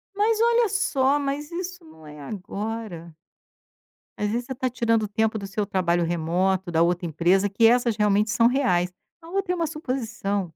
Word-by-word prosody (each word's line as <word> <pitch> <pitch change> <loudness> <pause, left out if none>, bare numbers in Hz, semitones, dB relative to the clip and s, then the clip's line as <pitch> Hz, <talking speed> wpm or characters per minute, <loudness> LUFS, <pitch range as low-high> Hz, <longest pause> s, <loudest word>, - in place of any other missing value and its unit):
Mas 435 +2 +2
olha 470 -1 +3
só, 280 -8 +2
mas 285 +2 -3
isso 360 +1 -6
não 160 - -16
é 150 0 -11
agora. 195 0 -6 1.0
Às 210 0 -1
vezes 240 +2 -2
você 265 - -6
tá 255 +1 -1
tirando 230 -2 +1
o - - -2
tempo 220 +1 0
do 200 - -6
seu 205 +1 -2
trabalho 175 -3 +1
remoto, 175 +2 0
da 165 0 +2
outra 175 +1 +1
empresa, 175 +5 +2
que 225 +4 +2
essas 240 -2 +3
realmente 210 0 +2
são 235 -1 +4
reais, 230 -9 +1 0.3
a 330 - -13
outra 385 -1 -1
é - - -1
uma 335 -2 -1
suposição. 235 - -3
220 Hz, 180 wpm, -24 LUFS, 185-275 Hz, 1.0 s, são